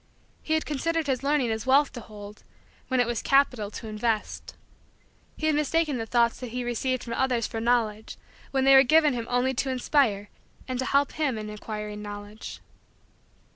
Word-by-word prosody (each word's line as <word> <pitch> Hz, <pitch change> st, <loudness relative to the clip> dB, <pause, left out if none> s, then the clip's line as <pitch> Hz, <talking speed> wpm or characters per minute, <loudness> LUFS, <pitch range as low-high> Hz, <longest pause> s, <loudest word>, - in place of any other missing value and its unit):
He 315 Hz, -, 0 dB
had 315 Hz, -, -1 dB
considered 325 Hz, +3 st, -1 dB
his 260 Hz, -3 st, -1 dB
learning 275 Hz, -4 st, +1 dB
as 220 Hz, +2 st, -4 dB
wealth 280 Hz, +2 st, +4 dB
to 250 Hz, -, -6 dB
hold 210 Hz, -1 st, -11 dB, 0.4 s
when 260 Hz, -1 st, 0 dB
it 245 Hz, -, +4 dB
was 235 Hz, -1 st, -2 dB
capital 255 Hz, -7 st, +2 dB
to 220 Hz, -, -8 dB
invest. 215 Hz, 0 st, -3 dB, 0.8 s
He 315 Hz, -, -3 dB
had 310 Hz, -, +3 dB
mistaken 300 Hz, -2 st, +1 dB
the 225 Hz, -, -4 dB
thoughts 235 Hz, 0 st, +2 dB
that 250 Hz, -, -6 dB
he 245 Hz, +2 st, -4 dB
received 245 Hz, +1 st, -1 dB
from 235 Hz, -, -5 dB
others 245 Hz, -3 st, +1 dB
for 225 Hz, -, -4 dB
Knowledge 225 Hz, -2 st, 0 dB, 0.3 s
when 270 Hz, -1 st, 0 dB
they 270 Hz, 0 st, +6 dB
were 270 Hz, -, +9 dB
given 300 Hz, +2 st, +4 dB
him 235 Hz, -1 st, -4 dB
only 245 Hz, +2 st, +1 dB
to 265 Hz, +2 st, -1 dB
inspire 250 Hz, -5 st, +1 dB, 0.4 s
and 255 Hz, -1 st, -3 dB
to 260 Hz, -, -1 dB
help 280 Hz, +1 st, +2 dB
him 290 Hz, -7 st, -1 dB
in 215 Hz, 0 st, -6 dB
acquiring 210 Hz, 0 st, -6 dB
Knowledge. 205 Hz, +1 st, -8 dB
245 Hz, 185 wpm, -26 LUFS, 220-275 Hz, 0.8 s, were